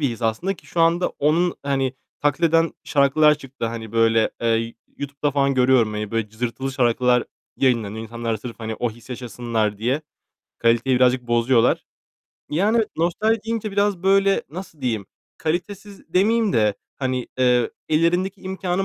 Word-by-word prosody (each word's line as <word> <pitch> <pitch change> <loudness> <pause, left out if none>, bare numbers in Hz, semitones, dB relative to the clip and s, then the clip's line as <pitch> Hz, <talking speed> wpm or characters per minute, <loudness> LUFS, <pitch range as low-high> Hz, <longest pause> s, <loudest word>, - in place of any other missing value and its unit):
bir 145 - +2
his 115 0 -7
aslında 115 - 0
ki - - -19
şu 170 - -2
anda 170 +2 +3
onu, 165 +5 +2
hani, 135 -2 0 0.3
taklit 145 +3 0
eden 165 0 +3
şarkılar 150 +2 +4
çıktı. 135 -4 -6
Hani, 115 -1 -6
böyle, 115 -1 +3
eee, 115 0 0 0.2
YouTube'da 140 +1 -2
falan 140 0 +1
görüyorum. 125 -4 +3
Hani, 105 -1 -4
böyle 115 -2 -1
cızırtılı 120 +4 -4
şarkılar 125 -1 +2 0.3
yayınlanıyor. 110 -5 0
İnsanlar 115 0 -3
sırf, 115 +2 -9
hani, 110 0 -4
o 120 +1 -2
hissi 120 +3 -10
yaşasınlar 115 -3 -2
diye 130 +7 0 0.6
kaliteyi 120 +3 +2
birazcık 125 0 +2
bozuyorlar. 120 0 +3 0.7
Yani 215 +8 +2
nostalji 205 +7 +1
deyince 225 -2 -2
biraz, 200 -3 +1
böyle, 195 +1 +3
nasıl 165 -2 -9
diyeyim, 110 -7 -2 0.3
kalitesiz 195 +5 -4
demeyeyim 215 +2 +3
de, 105 -2 +2 0.2
hani, 130 -2 -2
eee, 125 -2 +3 0.2
ellerindeki 175 +5 +1
imkânın 190 0 -2
130 Hz, 150 wpm, -22 LUFS, 115-170 Hz, 0.7 s, şarkılar